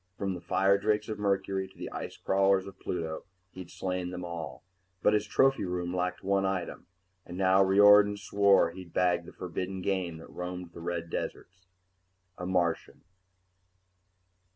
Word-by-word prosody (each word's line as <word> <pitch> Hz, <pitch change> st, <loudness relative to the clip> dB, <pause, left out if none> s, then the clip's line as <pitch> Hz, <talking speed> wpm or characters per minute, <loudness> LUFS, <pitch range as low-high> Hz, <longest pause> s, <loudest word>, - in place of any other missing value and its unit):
From 100 Hz, -1 st, -2 dB
the 90 Hz, -, -7 dB
firedrakes 100 Hz, +2 st, +2 dB
of 110 Hz, -, -4 dB
Mercury 95 Hz, -1 st, 0 dB
to 95 Hz, -, -22 dB
the -, -, -6 dB
ice -, -, -6 dB
crawlers 95 Hz, 0 st, +2 dB
of 95 Hz, -1 st, -11 dB
Pluto, 80 Hz, -3 st, -4 dB, 0.3 s
he'd 90 Hz, -2 st, -10 dB
slain 90 Hz, -1 st, -3 dB
them 90 Hz, 0 st, -6 dB
all. 80 Hz, -6 st, -7 dB, 0.4 s
But -, -, +4 dB
his 105 Hz, 0 st, +1 dB
trophy 135 Hz, +6 st, +3 dB
room 90 Hz, -1 st, -3 dB
lacked 90 Hz, 0 st, -2 dB
one 100 Hz, 0 st, +1 dB
item; 95 Hz, -2 st, -3 dB, 0.4 s
and 90 Hz, -, -9 dB
now 95 Hz, 0 st, +4 dB
Riordan 105 Hz, +1 st, +6 dB
swore 100 Hz, -1 st, +3 dB
he'd 90 Hz, -1 st, -11 dB
bag 90 Hz, -2 st, +2 dB
the -, -, -11 dB
forbidden 90 Hz, +1 st, -5 dB
game 90 Hz, -4 st, -1 dB
that 80 Hz, -, -12 dB
roamed 90 Hz, -1 st, -6 dB
the 85 Hz, -, -10 dB
red 85 Hz, -1 st, -4 dB
deserts... 90 Hz, 0 st, -6 dB, 0.7 s
a 90 Hz, -, -6 dB
Martian! 90 Hz, -3 st, -1 dB
95 Hz, 155 wpm, -29 LUFS, 90-100 Hz, 0.7 s, Riordan